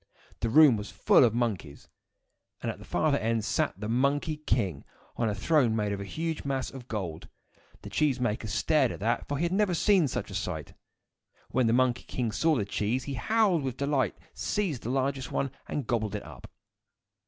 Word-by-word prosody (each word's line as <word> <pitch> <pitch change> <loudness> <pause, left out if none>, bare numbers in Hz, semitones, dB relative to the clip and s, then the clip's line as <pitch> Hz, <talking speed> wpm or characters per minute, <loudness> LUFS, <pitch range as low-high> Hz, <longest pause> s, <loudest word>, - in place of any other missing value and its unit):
The 115 - 0
room 140 -1 +7
was 105 -1 -6
full 95 +7 +4
of 115 -2 +3
monkeys; 105 -12 -2 0.7
and - - -2
at - - -11
the - - -12
farther 150 -3 +1
end 115 -1 0
sat - - 0
the 105 - -4
Monkey 140 +6 +1
King, 100 - -1 0.3
on 115 -2 0
a 105 - -2
throne 120 0 +2
made 105 -2 0
of 100 -1 -3
a - - -5
huge 160 +8 -3
mass 135 -2 -2
of 130 -3 -10
gold. 90 -9 -5 0.5
The - - -8
cheese 145 -4 +1
maker 110 -2 -1
stared 130 +5 +2
at - - -7
that, 115 +2 0
for 145 - -2
he 160 - -1
had 170 - 0
never 195 -2 +2
seen 190 -3 +4
such - - -4
a - - -7
sight. - - -4 0.8
When 125 -2 +2
the 115 - +3
Monkey 125 -1 +2
King 120 -3 -2
saw 160 +7 +2
the 105 -6 0
cheese, 105 +5 -1
he 140 - -5
howled 200 - +2
with 130 -2 -3
delight, 140 -6 0 0.2
seized 180 - -2
the 115 - -5
largest 135 0 -1
one, 135 - -1 0.2
and 145 - -3
gobbled 110 -3 -1
it 105 - -4
up. - - -12
125 Hz, 200 wpm, -28 LUFS, 110-145 Hz, 0.8 s, room